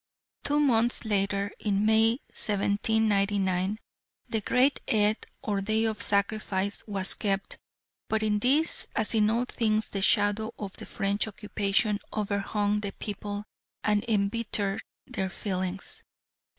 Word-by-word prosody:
Two 290 +1 +1
months 240 -5 +3
later, 200 -1 0
in 205 -1 0
May, 225 +3 +4
1799, 200 -2 +1 0.5
the 220 - -1
great 255 +7 +3
Eed, 215 0 +1 0.2
or 205 -2 -1
day 215 +2 +1
of 220 -2 -1
sacrifice, 200 -1 0
was 195 -2 +2
kept, 195 -2 -2 0.5
but 220 0 +1
in 210 -1 +1
this 285 +9 +3
as 220 0 +2
in 215 -1 +4
all 235 +3 +1
things 220 -3 0
the 195 - -3
shadow 210 +2 +2
of 195 -3 -6
the - - -9
French 200 +2 -1
occupation 210 0 0
overhung 205 0 0
the 200 -1 -4
people 205 0 -5 0.4
and 210 -1 +2
embittered 205 -1 0 0.2
their 200 -8 -3
feelings. 185 -1 -4
210 Hz, 125 wpm, -28 LUFS, 200-220 Hz, 0.5 s, May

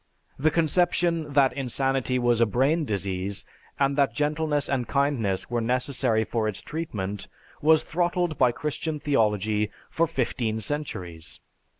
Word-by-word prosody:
The 155 +3 +4
conception 165 -1 +1
that 135 -2 +4
insanity 135 -1 0
was 120 -1 +2
a 115 - +5
brain 140 - +2
disease, 100 -1 -2 0.3
and 140 0 +2
that 140 - +2
gentleness 150 0 0
and 130 -4 -1
kindness 125 -9 0
were 120 -1 +1
necessary 125 -1 +1
for 110 -1 -1
its 105 - -3
treatment, 105 - -4 0.3
was 155 +1 +5
throttled 175 -1 0
by 125 -2 +4
Christian 150 +3 -3
theology 105 -6 +1 0.2
for 165 +1 +2
fifteen 120 -6 -1
centuries. 90 - -4
135 Hz, 130 wpm, -26 LUFS, 110-150 Hz, 0.3 s, a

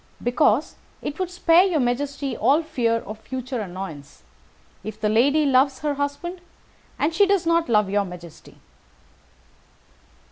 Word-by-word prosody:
"Because 245 +2 +1 0.3
it 295 - -5
would 370 -2 -1
spare 355 -1 +4
your 360 -5 +1
majesty 270 +1 -2
all 300 +8 +3
fear 245 -8 0
of 215 +1 -8
future 255 +1 -5
annoyance. 175 - -8 0.6
If 215 +1 -7
the 215 -1 0
lady 280 +8 +3
loves 270 0 +3
her 295 -1 0
husband, 285 +6 -4 0.7
she 400 +5 +3
does 390 -3 +1
not 335 -2 +2
love 210 -3 +3
your 200 +1 +1
majesty. 175 -3 -12
265 Hz, 135 wpm, -23 LUFS, 215-315 Hz, 0.7 s, spare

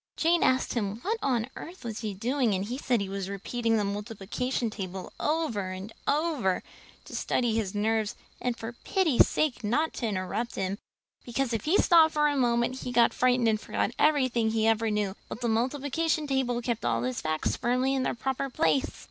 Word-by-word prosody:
Jane 335 +1 +3
asked 260 0 +2
him 210 -3 -1
what 445 - -1
on 245 - +1
earth 350 0 -9
he 220 -1 -4
was 195 -2 -8
doing 245 -2 +1
and 190 +1 -2
he 245 +5 -4
said 250 -5 +1
he 200 - -2
was 195 0 -4
repeating 225 +3 -1
the 210 - +1
multiplication 215 +4 -2
table 190 -3 -6
over 295 - 0
and 190 +4 -7
over 290 - +1 0.4
to - - -8
steady 240 -3 0
his 210 -3 -1
nerves 215 0 0 0.3
and 245 -1 -1
for 225 +1 -6
pity's 355 -10 +4
sake 290 -6 0
not 275 +10 +1
to 235 - -2
interrupt 205 +4 -2
him, 195 +1 -2 0.4
because 245 0 -1
if 225 - -2
he 340 +6 +4
stopped 325 -3 +5
for 300 0 +4
a 290 - +1
moment 240 0 +1
he 250 - -5
got 235 -1 +4
frightened 250 -2 +3
and 215 -1 +2
forgot - - -1
everything 255 -7 +3
he 220 0 +1
ever 225 0 +2
knew, 210 -2 0 0.2
but - - -6
the 240 - 0
multiplication 285 +7 0
table 255 -4 0
kept 230 -2 -2
all 115 +1 +1
his 125 0 -2
facts 155 0 -1
firmly 255 +2 +1
in 270 - +1
their 255 - -1
proper 265 +3 -2
place! 280 -1 +1
235 Hz, 195 wpm, -28 LUFS, 210-270 Hz, 0.4 s, stopped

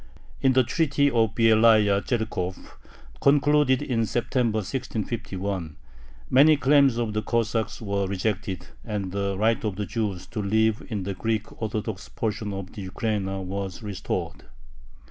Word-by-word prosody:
In 135 -1 +4
the 130 0 +5
Treaty 145 +1 +1
of 110 -2 +2
Byelaya 110 -3 +5
Tzerkov, 105 -7 -2 0.6
concluded 145 -1 +4
in 115 -3 0
September, 120 -1 0
1651, 100 - -4 0.5
many 145 - +6
claims 135 -1 +4
of 115 -3 -1
the 105 - 0
Cossacks 115 0 -1
were 100 -3 -1
rejected, 95 -1 -3
and 105 -4 -3
the 100 0 -2
right 110 +3 +1
of 105 -3 -2
the 105 +1 -3
Jews 100 -3 -3
to 105 - -5
live 110 +2 +2
in 105 -5 -3
the 100 +1 -3
Greek 110 +3 -3
Orthodox 110 -2 -4
portion 105 -1 -3
of 95 -1 -6
the 105 - -7
Ukraina 95 -1 -2
was 95 +1 -5
restored. 100 -3 -4
110 Hz, 140 wpm, -25 LUFS, 100-115 Hz, 0.6 s, many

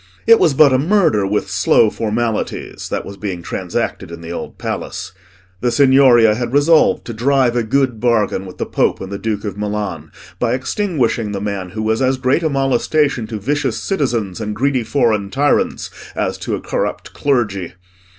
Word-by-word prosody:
It 455 -1 +7
was 145 - +3
but 140 -2 +6
a 130 - +3
murder 155 - +2
with 105 +2 -1
slow 110 - +3
formalities 115 0 -3
that - - -3
was 100 - -9
being 95 -5 -5
transacted - - -3
in 85 0 -9
the 85 0 -7
Old - - -6
Palace. - - -5 0.5
The 120 - +1
Signoria 130 -3 +5
had 120 +2 -3
resolved 150 +3 +4
to 115 - -6
drive 125 +1 +2
a 120 - +2
good 125 0 0
bargain 110 -5 +1
with 90 - -11
the - - -2
Pope - - 0
and 95 - -7
the 100 - -4
Duke 110 -2 -3
of 100 -1 -5
Milan, 105 -7 -4 0.3
by 120 0 +1
extinguishing 130 - -1
the 100 - -3
man 100 -2 -4
who 110 +4 -5
was 110 +3 0
as 130 0 +2
great 130 +5 +1
a 160 - 0
molestation 135 -2 +1
to 110 0 -5
vicious 135 +2 -1
citizens 115 - -2
and 105 -1 -3
greedy 130 +1 0
foreign 110 -6 +1
tyrants 145 +6 0 0.2
as - - -2
to - - -2
a - - -6
corrupt - - -3
clergy. 105 -10 -1
115 Hz, 180 wpm, -18 LUFS, 105-135 Hz, 0.5 s, It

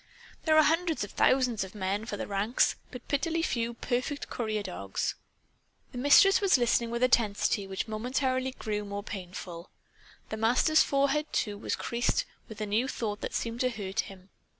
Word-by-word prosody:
There 310 -1 +4
are 310 - +8
hundreds 325 -3 +1
of 205 - -6
thousands 250 -5 +2
of 190 +2 -10
men 200 +2 -2
for 205 - -4
the - - -4
ranks, 205 +4 +1
but 250 - -10
pitifully 325 +4 0
few 235 -5 -1
perfect 255 +5 -3
courier 215 -3 -2
dogs." 95 - -3 0.8
The 245 - -6
Mistress 380 +10 +6
was 390 -7 +5
listening 235 -1 +2
with 235 +1 -2
a - - +6
tensity 205 -4 +1
which 190 +3 -3
momentarily 255 +4 -1
grew 210 -4 -3
more 200 0 -5
painful. 180 -3 -7 0.6
The 220 - -4
Master's 245 +8 +4
forehead, 280 +2 +1
too, 210 -3 -1
was 205 - -3
creased 245 - 0 0.2
with 220 -1 -9
a 215 - -2
new 215 +5 +1
thought 210 -6 -3
that - - -4
seemed 230 0 -3
to 255 - +2
hurt 200 -5 -5
him. 190 0 -5
230 Hz, 175 wpm, -29 LUFS, 205-265 Hz, 0.8 s, are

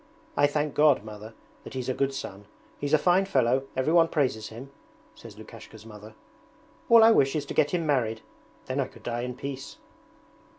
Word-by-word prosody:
'I 145 - +4
thank 150 0 -2
God, 150 -7 +4
Mother, 110 +1 -10 0.3
that - - -10
he's 130 -2 -4
a 130 - 0
good 135 +1 0
son! 105 -7 -8 0.3
He's 145 +2 +1
a - - +5
fine 180 +5 +3
fellow, 130 -6 +1
everyone 165 +5 +3
praises 130 -9 -1
him,' 125 +5 -10 0.4
says - - -14
Lukashka's 110 -1 -13
mother. 110 0 -12 0.7
'All 230 -1 +8
I 225 - +7
wish 135 -9 +3
is 150 -2 -2
to - - -6
get 145 - +2
him 170 -2 -1
married; 115 -7 0 0.4
then - - -3
I - - 0
could - - -18
die 120 0 -3
in 125 0 -5
peace.' 135 +1 -7
135 Hz, 185 wpm, -26 LUFS, 115-150 Hz, 0.7 s, All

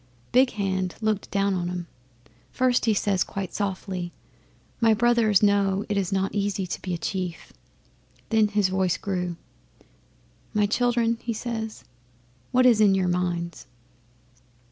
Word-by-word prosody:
'Big 255 +1 +5
Hand 190 -3 -1
looked 215 -2 -1
down 200 0 +1
on 175 -1 -2
'em. 180 -1 -4 0.7
First 255 -1 +2
he 225 - +3
says 195 -2 +1
quite 195 -2 -5
softly, 190 -3 -3 0.7
"My 225 -2 +4
brothers 225 -3 +3
know 200 -1 +2
it 205 - 0
is 195 -3 -1
not 195 0 0
easy 200 -2 -1
to 175 - -5
be 185 -2 -3
a - - -3
chief." 180 -2 -4 0.8
Then 220 -2 +4
his 205 -2 +1
voice 185 -1 +1
grew. 180 -3 -3 1.2
"My 210 -1 +4
children," 235 +1 +1
says 225 -1 -4
he, - - -28 0.7
"what 255 0 +4
is 235 -4 +5
in 200 -2 +5
your 185 -2 +1
minds?" 175 -1 -2
200 Hz, 145 wpm, -25 LUFS, 185-220 Hz, 1.2 s, Big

